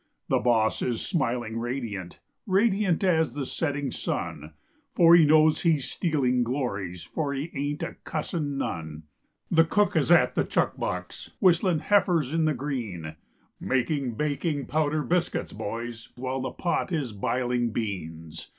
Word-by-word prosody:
The - - +3
boss 110 -3 +2
is 120 -2 -1
smiling 120 - -1
radiant, 115 -7 -5 0.3
Radiant 195 -2 +2
as 160 -8 +2
the 145 -2 -2
setting 145 -2 -2
sun; 80 -8 -4 0.4
For 170 -1 +7
he 165 -2 +7
knows 155 +1 +5
he's 155 -6 +1
stealing 130 -8 +1
glories, 105 -9 -3
For 145 -3 -3
he 145 +5 -4
ain't 145 +1 -3
a - - -5
cussin' 150 -2 -3
none. 80 - -4 0.5
The 165 -1 +6
cook 205 +3 +1
is 155 -2 +2
at 175 - +5
the - - +1
chuck - - 0
box - - -5
Whistling 180 -3 +3
"Heifers 175 -8 +2
in 165 -1 +2
the 155 -2 +1
Green," 110 - -4 0.4
Making 130 -1 -1
baking 150 +1 -1
powder 155 0 0
biscuits, 175 +2 -1
boys, 115 +2 -5
While 130 +1 -3
the 130 - -2
pot 175 +1 -1
is 145 -9 -2
biling 120 +2 0
beans. 80 -8 -5
135 Hz, 145 wpm, -27 LUFS, 115-160 Hz, 0.5 s, For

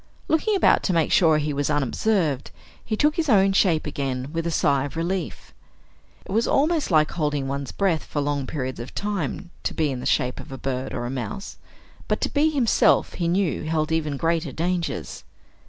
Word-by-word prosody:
Looking 365 +7 +2
about 385 - +4
to 185 - +1
make 165 -2 +2
sure 160 -4 +5
he 150 0 -1
was 140 0 -1
unobserved, 145 - 0 0.3
he 215 - -2
took 300 +4 +2
his 320 -3 0
own 195 -4 +5
shape 175 -5 +3
again 135 -1 -3
with 165 0 -1
a - - 0
sigh 140 -4 +2
of 145 - -7
relief. 180 +3 -3 0.7
It - - -9
was 225 +4 +2
almost 305 +1 +2
like 155 -3 +3
holding 150 -4 -1
one's 140 -1 -3
breath 185 -6 0
for 150 - -3
long 145 -2 -1
periods 130 -4 -4
of 120 - -8
time, 195 -3 -3
to - - -3
be 155 -3 +1
in 130 - -4
the - - -3
shape 125 0 +1
of - - -10
a 135 - -6
bird 130 0 -3
or 120 - -3
a 120 - -3
mouse, 195 +10 -5 0.5
but - - 0
to - - 0
be 300 +2 +2
himself, 270 -7 +3
he 170 - -2
knew, 180 0 0
held 155 0 -1
even 155 -3 0
greater 165 -1 0
dangers. 170 +3 -3
160 Hz, 200 wpm, -24 LUFS, 140-195 Hz, 0.7 s, sure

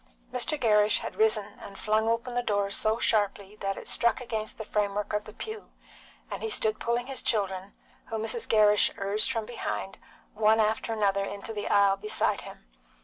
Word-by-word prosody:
Mr. 255 +4 +1
Gerrish 210 -3 +3
had - - -6
risen 215 -2 +2
and 195 - -10
flung 215 +1 +1
open 230 +2 -1
the 245 - +1
door 205 -3 0
so 215 +2 +2
sharply 205 -3 0
that 195 -1 -3
it - - -8
struck 235 0 +2
against 220 -3 -4
the 220 - -6
frame 205 -1 -1
work 210 0 -3
of 210 0 -1
the 215 - -9
pew, 435 - -8 0.6
and - - -4
he 445 - -2
stood 220 - +1
pulling 235 +1 -1
his 270 0 -3
children, 195 -3 -1 0.3
whom 220 -1 -4
Mrs. 450 - -2
Gerrish 210 -2 +5
urged 205 +5 +1
from 225 -4 -2
behind, 215 -4 -5 0.3
one 220 +1 +3
after 220 +1 +1
another, 200 -3 +1
into 200 +3 -6
the 205 -1 -4
aisle 200 -1 +4
beside 215 +2 0
him. - - -12
215 Hz, 190 wpm, -28 LUFS, 205-230 Hz, 0.6 s, Gerrish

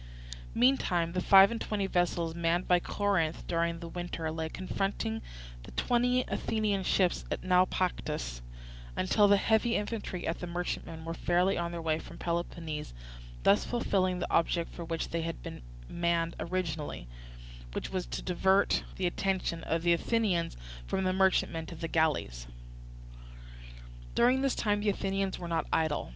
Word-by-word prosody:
Meantime 185 -10 +3
the 180 +1 -1
five 195 +3 +8
and 230 - -4
twenty 205 -2 -1
vessels 175 -3 0
manned 170 +1 0
by 180 -1 +5
Corinth 175 -4 0
during 170 0 0
the 170 0 -7
winter 165 -2 -4
lay 160 0 -3
confronting 185 - -2 0.4
the - - -11
twenty 250 +1 +2
Athenian 215 -3 0
ships 185 -1 +2
at - - -3
Naupactus 180 - 0 0.6
until 205 +3 +4
the 200 0 +6
heavy 220 +3 +2
infantry 205 -4 -3
in 165 - +1
the 175 - -5
merchantmen 170 -2 -4
were 165 - -3
fairly 180 +3 +2
on 170 0 -2
their 170 -1 -5
way 160 -1 +1
from - - -11
Peloponnese; 165 - -3 0.5
thus 200 - +5
fulfilling 190 -6 0
the 180 - -3
object 170 0 +1
for 170 - -6
which 165 -1 -3
they 170 - -1
had 165 0 -5
been - - -7 0.3
manned 170 -1 0
originally, 165 - -3 0.7
which - - -4
was 185 -2 -2
to - - -5
divert 190 +2 +2
the 190 - -2
attention 180 -2 -1
of 165 0 -1
the 175 0 +5
Athenians 180 - 0 0.3
from 190 - -1
the 185 0 +1
merchantmen 185 -4 +2
to 170 - -8
the 165 +1 -4
galleys. 145 - 0 1.7
During 250 +3 +4
this 275 -1 +1
time 205 -2 +1
the 205 0 +1
Athenians 195 -1 -1
were 175 - -6
not 165 -2 -1
idle. 155 - 0
175 Hz, 155 wpm, -30 LUFS, 165-195 Hz, 1.7 s, five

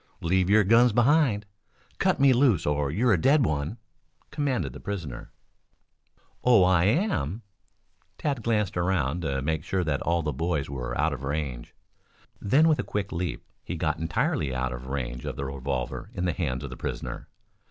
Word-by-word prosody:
Leave 90 +2 +1
your 105 +1 +6
guns 115 +4 +5
behind. 120 -2 +3 0.5
Cut - - +2
me 135 -1 +6
loose 120 - +3
or 75 -1 0
you're 110 - +2
a 85 - +1
dead 140 - +4
one," 75 +5 -2 0.5
commanded 125 - -1
the - - -9
prisoner. 85 -11 -6 1.1
"Oh, 115 -7 +6
am 100 - +2
I?" 80 +10 -5 0.8
Tad 140 -5 -1
glanced 105 -4 0
around 85 -3 0
to 70 -5 -2
make 80 +1 -1
sure 95 +2 -1
that 75 -3 -1
all 85 0 0
the 75 -1 -2
boys 80 -4 -1
were - - -4
out - - +2
of - - -6
range. 70 -3 -4 0.7
Then 140 +10 +4
with 155 -2 +3
a - - 0
quick 105 -1 -3
leap 90 -1 -3 0.2
he 90 - -5
got 80 -1 -1
entirely 80 -4 -1
out 65 0 -1
of - - -8
range 65 -3 -4
of - - -4
the 70 - -4
revolver 65 -2 -4
in 90 - -1
the 90 - +1
hands 65 -7 -2
of - - -6
the - - -8
prisoner. - - -5
85 Hz, 175 wpm, -26 LUFS, 70-110 Hz, 1.1 s, your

